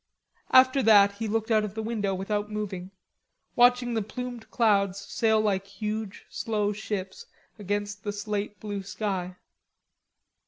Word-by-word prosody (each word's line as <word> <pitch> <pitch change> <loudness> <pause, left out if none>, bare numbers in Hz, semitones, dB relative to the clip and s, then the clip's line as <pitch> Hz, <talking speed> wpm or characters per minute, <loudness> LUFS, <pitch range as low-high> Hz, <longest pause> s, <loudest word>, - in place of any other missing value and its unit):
After 260 +1 +6
that 205 -3 +6
he 220 +2 -5
looked 225 +1 -1
out 215 -1 +4
of 210 -1 -5
the 220 - -3
window 210 -4 -1
without 205 +2 -2
moving, 200 -4 -4 0.7
watching 245 0 +4
the 225 - +1
plumed 245 +2 -6
clouds 200 -4 +2
sail 220 +2 +1
like 195 -2 0
huge 210 0 -5
slow 210 -2 -1
ships 200 -2 -5 0.3
against 205 0 -3
the 205 - -2
slate 205 -1 -4
blue 205 -1 -4
sky. 190 -2 -3
210 Hz, 135 wpm, -27 LUFS, 200-220 Hz, 0.7 s, After